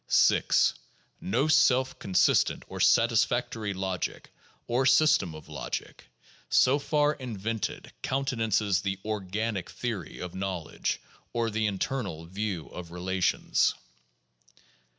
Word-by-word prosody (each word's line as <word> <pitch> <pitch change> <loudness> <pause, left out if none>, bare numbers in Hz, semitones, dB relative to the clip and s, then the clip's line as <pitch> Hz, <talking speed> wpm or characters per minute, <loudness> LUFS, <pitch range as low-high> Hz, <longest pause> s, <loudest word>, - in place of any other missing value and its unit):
6. - - +4 0.5
No 135 +10 +1
self 130 -4 +3
consistent 95 -2 +2
or - - -7
satisfactory 115 -2 +2
logic 95 -2 -4 0.3
(or 120 +3 +1
system 135 - +4
of 75 - -11
logic) - - -6 0.4
so 135 +3 +4
far 150 +1 +2
invented 115 -5 -4
countenances 115 -7 0
the 95 -1 -2
"organic" 105 -1 -2
theory 110 -10 -5
of 90 -1 -6
knowledge 95 -4 -3 0.3
or 115 -1 0
the 110 0 0
"internal" 100 - -3
view 95 -2 -3
of 90 -2 -8
relations. 90 +1 +1
110 Hz, 105 wpm, -28 LUFS, 95-125 Hz, 0.5 s, 6